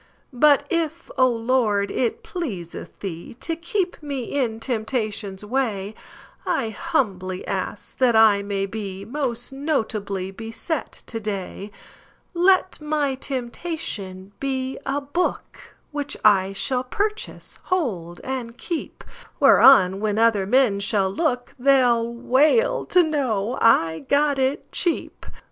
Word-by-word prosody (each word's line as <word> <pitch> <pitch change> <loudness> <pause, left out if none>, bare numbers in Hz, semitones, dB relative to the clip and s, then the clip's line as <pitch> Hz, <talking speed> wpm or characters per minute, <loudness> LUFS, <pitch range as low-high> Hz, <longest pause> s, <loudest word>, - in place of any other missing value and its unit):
But 285 +2 +5
if, 335 0 -2
O 260 -2 +5
Lord, 230 -4 +1
it 250 - -1
pleaseth 275 - -6
TheeTo 205 - -5
keep 355 +1 -2
me 280 -4 -4
in 235 -3 -2
temptation's 215 -4 -3
way,I 220 - -3
humbly 190 - -2
ask 195 +1 -4
that 250 -3 +4
I 220 -2 +6
may 200 -1 -2
beMost 225 +6 -4
notably 215 -10 -2
beset 225 - -5
to 225 - -5
day; 200 -1 -5 0.6
Let 370 0 +3
my 300 -2 0
temptation 245 - -5
be 265 -1 -2
a 280 +2 0
book, 315 +6 -3 0.2
Which 290 -1 -4
I 195 -2 +5
shall 250 +6 -1
purchase, 420 +11 -4
hold, 195 - -2
and 245 -3 -5
keep, 335 -3 -5 0.4
Whereon 195 -8 +7
when 210 0 -1
other 220 -4 +3
men 245 -4 +3
shall 195 -1 +1
look, 250 - -1
They 270 0 +5
'll 235 -1 +2
wail 295 - +2
to 360 - +5
know 255 -8 -1
I 165 -8 +4
got 285 -1 +3
it 265 +2 -1
cheap. 345 -3 -2
245 Hz, 120 wpm, -23 LUFS, 205-285 Hz, 0.6 s, Whereon